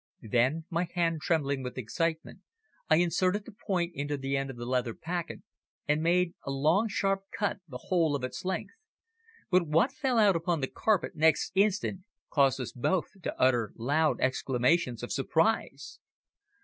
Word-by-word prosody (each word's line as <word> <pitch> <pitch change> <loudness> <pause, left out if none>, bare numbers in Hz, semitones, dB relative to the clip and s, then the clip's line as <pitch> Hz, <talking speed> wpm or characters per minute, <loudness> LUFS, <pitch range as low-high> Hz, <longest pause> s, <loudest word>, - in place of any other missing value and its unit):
Then, 130 +7 +2
my 170 +1 0
hand 165 -3 +1
trembling 140 -5 0
with 125 0 -6
excitement, 160 +7 -2 0.5
I 155 - +6
inserted 185 +4 +1
the - - -10
point 180 -4 -2
into 145 -1 -3
the 135 0 -2
end 135 0 -1
of 130 - -8
the 120 - -6
leather 125 -2 -1
packet 170 0 -5 0.4
and 150 +1 +2
made 175 +1 +2
a - - -6
long 155 +11 +2
sharp 195 -2 -1
cut 205 -1 -1
the 130 -5 -7
whole 160 +1 +1
of 135 - -4
its 125 - -5
length, 190 - -3 0.8
but 180 -2 +3
what 165 - +3
fell 260 -3 -1
out 205 -4 +5
upon 165 0 0
the 135 - -1
carpet 210 +1 0
next 160 0 +3
instant 195 -1 +1 0.3
caused 135 -2 +3
us 130 - -4
both 170 +8 0
to - - -5
utter 120 -4 +2
loud 145 +6 +1
exclamations 130 0 +1
of 120 - -4
surprise. 160 +9 0
160 Hz, 165 wpm, -29 LUFS, 135-180 Hz, 0.8 s, I